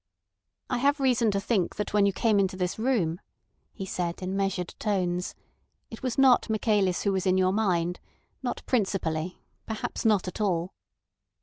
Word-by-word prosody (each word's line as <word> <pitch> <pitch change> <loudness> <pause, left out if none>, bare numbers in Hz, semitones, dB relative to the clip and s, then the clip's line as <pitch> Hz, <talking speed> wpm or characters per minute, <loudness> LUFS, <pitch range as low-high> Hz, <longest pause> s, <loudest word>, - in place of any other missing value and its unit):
"I 250 - -1
have 285 +3 +2
reason 250 -4 +3
to 200 -1 +1
think 195 -3 0
that 210 - -3
when 205 -1 +4
you - - +2
came 210 +2 +2
into 190 -1 0
this 180 +2 -2
room," 210 -9 0 0.5
he 195 - -6
said 175 -1 -3
in 185 +1 -2
measured 195 -3 -1
tones, 180 -3 -1 0.6
"it 225 - -9
was 255 -3 -2
not 260 -3 +5
Michaelis 210 -4 +1
who 200 - +2
was 190 0 -1
in 185 0 +3
your 185 0 +3
mind; 180 -5 0 0.4
not 250 -2 -3
principally—perhaps 190 -1 -2
not 210 -5 +3
at 185 - -5
all." 180 -3 0
195 Hz, 165 wpm, -27 LUFS, 180-220 Hz, 0.6 s, not